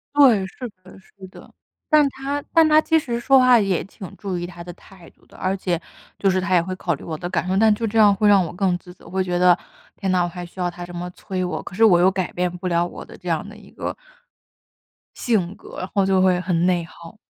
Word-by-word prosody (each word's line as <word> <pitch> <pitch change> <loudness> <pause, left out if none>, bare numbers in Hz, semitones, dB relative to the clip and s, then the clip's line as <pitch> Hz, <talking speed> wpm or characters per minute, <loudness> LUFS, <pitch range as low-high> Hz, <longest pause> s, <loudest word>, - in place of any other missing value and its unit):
对， 240 -9 +5
是 250 +6 -8 0.2
的 185 +1 -15
是 190 0 -15
的。 - - -16 0.4
但 300 -2 +6
他 280 +2 -4
但 325 -2 +6
他 310 0 +6
其 320 0 +2
实 240 -5 -3
说 265 +2 +5
话 250 -2 +6
也 195 -4 0
挺 190 -1 -11
注 195 -4 -4
意 175 - -4
他 175 -1 -9
的 175 - -8
态 185 -1 -17
度 - - -29
的， - - -21
而 190 +1 -1
且 175 -3 -1 0.4
就 195 - +2
是 185 0 +1
他 185 0 -1
也 175 - +5
会 185 +2 -5
考 175 -2 -2
虑 145 - -8
我 160 -2 -5
的 175 - -5
感 180 - -2
受， 190 +1 0
但 220 0 +5
就 225 +2 -2
这 225 +2 -2
样 205 -2 +6
会 210 +2 +1
让 195 -3 +5
我 165 - -7
更 180 -1 0
自 180 0 -14
责， - - -17
会 190 0 -1
觉 175 -1 -2
得， 180 -1 +5 0.4
天 190 -2 -2
呐， 180 -1 +2
我 - - -1
还 175 0 -7
需 180 +2 -15
要 175 -1 0
他 175 0 -8
这 175 - -11
么 175 +1 -5
催 185 0 -5
我， 180 - -3
可 - - -10
是 225 - +2
我 180 -6 +6
又 185 +2 +4
改 185 -2 -3
变 180 0 -1
不 185 +1 -5
了 170 0 +1
我 - - -8
的 - - -14
这 - - -12
样 - - -1
的 - - -11
一 - - -16
个 - - -5 1.2
性 200 -6 0
格， - - -11
然 185 - -5
后 200 -2 +2
就 190 -1 +2
会 185 -1 +3
很 175 -1 0
内 175 -2 +1
耗。 170 +5 -14
185 Hz, 290 characters per minute, -22 LUFS, 175-210 Hz, 1.2 s, 但